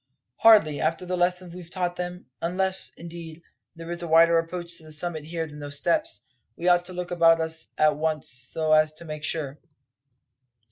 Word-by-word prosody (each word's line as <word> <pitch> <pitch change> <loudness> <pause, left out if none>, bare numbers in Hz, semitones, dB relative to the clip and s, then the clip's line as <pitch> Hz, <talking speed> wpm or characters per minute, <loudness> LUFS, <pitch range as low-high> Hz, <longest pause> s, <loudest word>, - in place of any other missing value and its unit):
"Hardly, 205 -10 +5
after 165 +2 -1
the 180 0 -2
lesson 180 0 0
we've 175 -1 -10
taught 180 -1 -2
them; 180 0 -6 0.2
unless, 190 +2 +2
indeed, 170 -1 -9 0.3
there 165 +1 -8
is 175 0 -4
a 170 - -4
wider 165 +1 +6
approach 170 0 -5
to - - -14
the 155 - -10
summit 155 0 -2
here 165 0 -3
than 150 -1 -11
those 145 -1 -4
steps. 320 - 0 0.3
We 175 - -3
ought 175 0 +4
to 185 - -8
look 180 0 -5
about 165 -1 +5
us 160 0 -2
at 155 -1 +3
once 155 -1 -1
so 125 +7 -2
as 155 0 +4
to 160 +2 -10
make 155 -1 -7
sure." 150 -2 -2
165 Hz, 190 wpm, -25 LUFS, 155-175 Hz, 0.3 s, wider